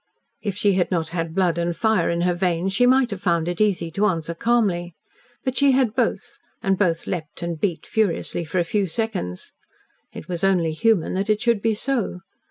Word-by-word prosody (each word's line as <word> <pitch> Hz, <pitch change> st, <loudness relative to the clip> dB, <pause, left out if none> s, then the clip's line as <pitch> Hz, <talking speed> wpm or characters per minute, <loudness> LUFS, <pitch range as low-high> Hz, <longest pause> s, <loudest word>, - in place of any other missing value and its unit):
If 200 Hz, -3 st, -3 dB
she 205 Hz, -1 st, +3 dB
had 185 Hz, -1 st, +1 dB
not 165 Hz, -4 st, -1 dB
had 165 Hz, -1 st, -3 dB
blood 175 Hz, -3 st, +2 dB
and 170 Hz, 0 st, -1 dB
fire 220 Hz, -5 st, +2 dB
in 170 Hz, 0 st, 0 dB
her 180 Hz, 0 st, +2 dB
veins, 180 Hz, +1 st, 0 dB
she 245 Hz, +5 st, +4 dB
might 255 Hz, -1 st, +4 dB
have 195 Hz, -2 st, -5 dB
found 170 Hz, -3 st, +1 dB
it 175 Hz, +3 st, -2 dB
easy 180 Hz, -6 st, +1 dB
to 205 Hz, +5 st, +2 dB
answer 170 Hz, -3 st, -2 dB
calmly. 180 Hz, -5 st, 0 dB, 0.5 s
But 260 Hz, -1 st, -2 dB
she 280 Hz, -1 st, +4 dB
had 255 Hz, -4 st, +2 dB
both, 245 Hz, -2 st, -1 dB, 0.2 s
and 195 Hz, 0 st, +2 dB
both 175 Hz, -4 st, 0 dB
leaped 170 Hz, -2 st, -5 dB
and 170 Hz, -2 st, -3 dB
beat 180 Hz, -5 st, -1 dB
furiously 200 Hz, -5 st, 0 dB
for 165 Hz, +3 st, -4 dB
a 175 Hz, -, +3 dB
few 195 Hz, +3 st, 0 dB
seconds. 190 Hz, -, -3 dB, 0.6 s
It -, -, -9 dB
was 175 Hz, -1 st, -4 dB
only 180 Hz, -4 st, +2 dB
human 205 Hz, +1 st, +1 dB
that 195 Hz, +3 st, -2 dB
it 210 Hz, 0 st, +3 dB
should 235 Hz, -3 st, +1 dB
be 225 Hz, 0 st, +1 dB
so. 230 Hz, -6 st, -2 dB
185 Hz, 205 wpm, -23 LUFS, 170-215 Hz, 0.6 s, she